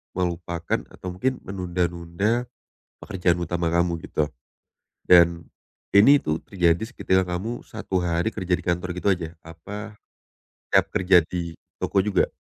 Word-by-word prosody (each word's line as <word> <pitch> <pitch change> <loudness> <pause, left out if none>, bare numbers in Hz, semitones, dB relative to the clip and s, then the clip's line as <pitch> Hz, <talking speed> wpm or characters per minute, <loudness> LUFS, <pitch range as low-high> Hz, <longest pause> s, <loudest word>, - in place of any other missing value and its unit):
melupakan 85 -2 -2
atau 95 - -11
mungkin 130 +9 0
menunda-nunda 90 +5 -1 0.6
pekerjaan 90 -2 +1
utama 85 0 -1
kamu, 85 0 +1
gitu. 75 - +1 0.8
Dan 85 -1 +5 0.5
ini 135 +9 +6
tuh 80 +1 -1
terjadi 85 -2 +1
seketika 95 -6 +1
kamu 95 +7 -4
1 110 -4 -3
hari 85 +4 0
kerja 95 -4 -1
di 90 - -2
kantor 90 +1 -1
gitu 90 +3 +1
aja? 85 -2 -2
Apa 105 +6 -9 0.7
setiap - - +5
kerja 90 -3 +5
di 85 -1 -5 0.2
toko - - -1
juga? 105 - +2
90 Hz, 130 wpm, -24 LUFS, 85-95 Hz, 0.8 s, ini